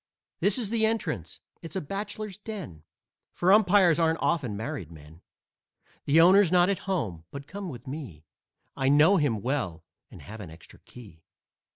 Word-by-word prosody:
This 200 +3 +2
is 225 -5 -3
the 230 -1 0
entrance. 125 - -2 0.2
It's 165 -2 -9
a - - 0
bachelor's 200 +4 -5
den, 195 - -8 0.5
For 185 +2 +3
umpires 190 -5 +4
aren't 165 0 +2
often 125 -11 -1
married 100 -6 -5
men. 80 +1 -15 0.8
The 150 +3 +4
owner's 185 +1 +6
not 180 0 +4
at 200 0 -5
home, 100 - -2
but 140 0 -9
come 195 +3 -7
with 120 -6 -10
me; 130 - -8 0.5
I 135 0 0
know 155 +8 +5
him 120 - 0
well 120 - -2 0.3
and - - -13
have 110 +2 -10
an 90 -5 -8
extra 80 +1 -15
key. 100 -10 -15
155 Hz, 165 wpm, -27 LUFS, -, 0.8 s, owner's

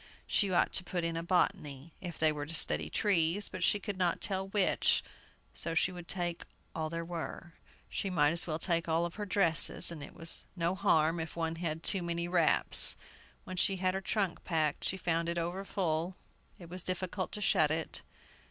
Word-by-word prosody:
She 200 -3 +1
ought 175 - +2
to 190 - +2
put 175 -1 -3
in 165 0 -2
a 165 - -2
"Botany," 165 -4 -1
if 175 -2 -7
they 155 -1 +2
were 145 -1 -5
to 165 - -4
study 75 - +3
trees; 190 - +1
but 185 - -7
she 205 +3 +2
could 200 -1 -5
not 175 -2 +1
tell 190 -1 -2
which, 195 -1 +2 0.5
so 165 -1 -5
she 180 - +2
would 175 -2 -10
take 175 -2 -2 0.3
all 160 -1 -3
there 165 +1 -5
were. 170 0 -7 0.3
She 195 - -3
might 150 -5 +2
as 170 +1 -2
well 155 -2 -2
take 170 0 -1
all 165 +1 +1
her 205 +5 -7
dresses, 175 -4 +5
and 160 -3 -8
it 140 - -10
was 165 0 0
no 170 0 0
harm 165 -2 +2
if 160 -1 -6
one 165 -1 -3
had 165 -1 -4
too 195 - +3
many 170 0 -3
wraps. 175 -3 +5 0.5
When 185 - -8
she 195 +2 +2
had 185 0 0
her 190 - -3
trunk 195 -2 -2
packed, 155 -4 -1
she 190 - 0
found 170 -2 -1
it 170 - -3
over 175 +3 -3
full; 175 -2 -2 0.4
it 175 - -12
was 180 +2 -4
difficult 185 +1 -3
to - - -4
shut 155 -6 +3
it. 160 +1 -4
170 Hz, 200 wpm, -31 LUFS, 165-185 Hz, 0.5 s, dresses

